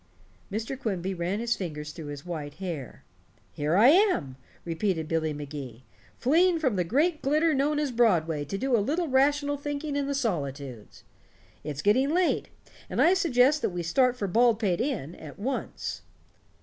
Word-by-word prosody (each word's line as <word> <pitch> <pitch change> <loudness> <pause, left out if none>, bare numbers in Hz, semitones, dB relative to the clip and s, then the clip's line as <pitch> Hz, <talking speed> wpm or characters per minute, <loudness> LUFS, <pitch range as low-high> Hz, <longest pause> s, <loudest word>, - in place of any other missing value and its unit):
Mr. 225 +6 -3
Quimby 190 -6 -2
ran 180 +3 -2
his 235 +1 0
fingers 150 -5 -5
through 155 -1 -9
his 145 +2 -7
white 155 -5 -5
hair. 170 -9 -6 0.5
"Here 150 +3 -1
I 230 +5 +7
am," 345 - +3 0.3
repeated 165 -1 -1
Billy 160 -1 0
Magee, 140 -5 -7 0.3
"fleeing 335 +6 +3
from 265 -9 0
the 180 - +1
great 300 - +1
glitter 310 +4 +2
known 290 +2 +1
as 295 -3 0
Broadway 170 -11 +2
to 175 +7 -4
do 260 +2 +1
a - - +3
little 320 - -1
rational 285 +2 +2
thinking 290 +1 -4
in 285 -1 -1
the 280 - -1
solitudes. 140 - -4 0.6
It's 145 -1 -5
getting 255 +7 +3
late, 355 +3 +1 0.4
and - - -3
I 355 - +6
suggest 295 -6 +3
that - - +1
we 175 -1 -4
start 250 +8 +2
for 205 - -2
Baldpate 220 -3 +2
Inn 225 - -2
at 155 -4 -11
once." 255 +6 -4
215 Hz, 165 wpm, -27 LUFS, -, 0.6 s, I